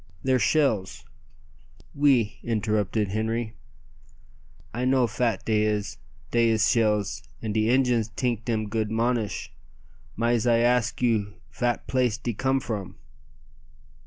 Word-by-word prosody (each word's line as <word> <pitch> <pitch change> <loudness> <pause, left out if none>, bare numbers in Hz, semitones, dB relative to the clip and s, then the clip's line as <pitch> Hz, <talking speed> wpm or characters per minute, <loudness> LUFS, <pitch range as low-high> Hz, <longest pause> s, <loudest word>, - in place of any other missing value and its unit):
"They're 130 -1 +2
shells 115 -11 +1 0.5
" 70 - -28
"Oui," 135 -7 +2
interrupted 110 -2 0
Henri; 110 +2 -2 1.2
"I 120 +3 -2
know 130 -1 +3
fat 120 -3 -1
dey 110 -1 +2
is. 105 -5 -1 0.3
Dey 115 -1 +3
is 110 -1 +3
shells, 105 -3 +1 0.2
and 110 -2 -3
de 110 +1 +1
Injuns 125 -3 +2
tink 120 -3 -1
dem 110 -3 -1
goot 110 0 -1
monish, 115 - -1 0.6
mais 115 0 +1
I 115 -1 +4
ask 120 0 +1
you 105 -4 +1 0.2
fat 120 -1 -1
place 125 -4 +1
de 120 0 -3
come 135 +4 +1
from." 105 -6 -5
115 Hz, 130 wpm, -26 LUFS, 105-120 Hz, 1.2 s, I